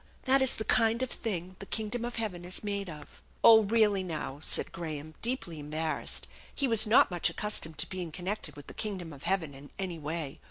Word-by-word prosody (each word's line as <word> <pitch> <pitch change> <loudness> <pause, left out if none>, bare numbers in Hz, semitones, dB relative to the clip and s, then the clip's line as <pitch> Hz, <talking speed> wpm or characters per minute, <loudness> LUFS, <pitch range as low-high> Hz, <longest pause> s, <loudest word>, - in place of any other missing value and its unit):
That 265 +1 +5
is 265 - +5
the 220 - -3
kind 230 +2 +3
of 260 - -3
thing 185 -4 -3
the 195 - -8
kingdom 220 +2 -2
of 240 - -4
heaven 205 -7 -2
is 180 +4 -4
made 200 -2 -2
of." 150 -2 -11
" - - -32
Oh, 225 -1 +10
really, 210 -2 +3
now," 155 -6 -4
said - - 0
Graham, 155 -2 -5
deeply 230 - -3
embarrassed; 155 +2 -1 0.3
he 275 - +1
was 225 -2 +4
not 215 -2 +6
much 175 -1 +1
accustomed 185 -7 -2
to - - 0
being 180 -3 -4
connected 185 +5 -4
with 145 - -10
the - - -9
king 210 -2 -2
dom 170 -4 -7
of 140 - -12
heaven 165 -6 0
in 140 +1 -12
any 180 -4 -3
way. 150 -1 -4
185 Hz, 215 wpm, -31 LUFS, 160-220 Hz, 0.3 s, Oh